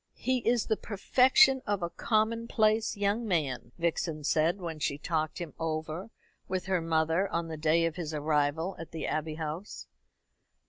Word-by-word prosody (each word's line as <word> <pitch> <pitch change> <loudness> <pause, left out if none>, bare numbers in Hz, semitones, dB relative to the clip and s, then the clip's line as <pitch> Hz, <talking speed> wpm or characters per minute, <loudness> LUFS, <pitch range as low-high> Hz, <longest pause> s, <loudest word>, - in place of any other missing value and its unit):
"He 255 0 0
is 235 -1 +1
the 220 - 0
perfection 260 - +4
of 205 -3 0
a 170 - -2
commonplace 220 -1 +1
young 205 +3 +1
man," 140 - -1
Vixen 165 -2 -1
said, 160 +5 +2
when 165 -4 -5
she 140 -1 -1
talked 155 0 -2
him 170 -5 -6
over 160 +4 -3 0.4
with 185 -1 -2
her 185 -2 +1
mother 165 +3 +1
on 170 -1 -2
the 160 - -4
day 160 +2 +2
of 165 +1 -2
his 165 -3 -4
arrival 150 +3 0
at 165 - -7
the 165 - -5
Abbey 155 0 -2
House. 160 +5 -5
170 Hz, 165 wpm, -30 LUFS, 155-205 Hz, 0.4 s, perfection